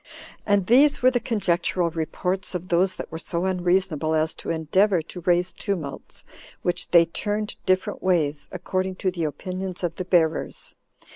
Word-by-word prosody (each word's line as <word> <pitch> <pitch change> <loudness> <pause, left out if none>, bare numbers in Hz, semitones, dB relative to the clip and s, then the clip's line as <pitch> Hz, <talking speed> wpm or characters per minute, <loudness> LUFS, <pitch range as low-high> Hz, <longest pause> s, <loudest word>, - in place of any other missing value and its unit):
And 205 -2 +3
these 270 +6 +4
were 255 - +6
the 245 - +1
conjectural 180 -6 0
reports 180 +4 -2
of 180 +1 -5
those 185 +2 +2
that - - -7
were 160 - -5
so 170 +2 -2
unreasonable 180 -4 +1
as 160 0 +1
to - - -8
endeavor 170 +3 +2
to 180 +2 -9
raise 175 +1 +2
tumults, 170 -9 -5 0.4
which 175 - -1
they 170 -1 +6
turned 210 +5 -3
different 185 0 +1
ways, 155 -6 +1
according 185 +1 -2
to 185 0 -1
the 170 -3 -2
opinions 185 +3 -5
of 170 -1 -2
the 185 - -3
bearers. 165 -3 0
180 Hz, 160 wpm, -24 LUFS, 165-190 Hz, 0.4 s, were